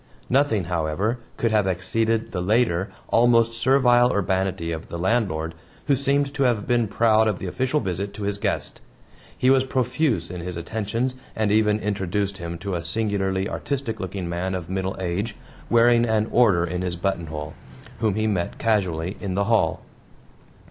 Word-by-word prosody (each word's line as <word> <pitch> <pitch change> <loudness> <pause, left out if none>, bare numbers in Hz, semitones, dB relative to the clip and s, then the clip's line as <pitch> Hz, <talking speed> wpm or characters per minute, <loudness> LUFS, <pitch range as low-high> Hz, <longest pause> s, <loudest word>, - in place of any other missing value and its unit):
Nothing, 130 -7 +3
however, 85 +7 -1 0.2
could 115 - +1
have 105 -3 +2
exceeded 110 +5 0
the 90 - -2
later 100 -2 +1 0.2
almost 115 -1 +4
servile 125 0 +4
urbanity 95 -3 -1
of 80 0 -5
the 85 - -6
landlord, 90 -5 0 0.3
who 140 - +3
seemed 140 +1 +1
to 145 - -3
have 120 -6 +2
been 120 -2 +2
proud 110 +1 +3
of 105 -4 0
the - - -6
official 130 +10 0
visit 95 - -3
to 105 - -6
his 100 0 -2
guest. - - -2 0.6
He 130 - +4
was 135 -1 +4
profuse 125 - 0
in 90 -1 -5
his 90 0 -5
attentions, 110 +7 -2 0.2
and 110 -2 +1
even 105 0 +3
introduced 100 -1 -2
him 85 0 -5
to 95 +3 -4
a 85 -1 -2
singularly 95 0 -1
artistic 130 -5 -3
looking 95 -1 -4
man 90 +2 -2
of 90 -1 -5
middle 95 0 -2
age, 95 +5 -2 0.3
wearing 120 0 +5
an 110 -1 +1
order 100 -9 +4
in 90 +1 -3
his 90 -1 -2
buttonhole, 80 -5 -3 0.5
whom 110 -3 +1
he 110 0 0
met 95 -5 -1
casually 95 -5 0
in 95 -3 -3
the 100 - +2
hall. 115 +1 +1
100 Hz, 170 wpm, -24 LUFS, 90-115 Hz, 0.6 s, wearing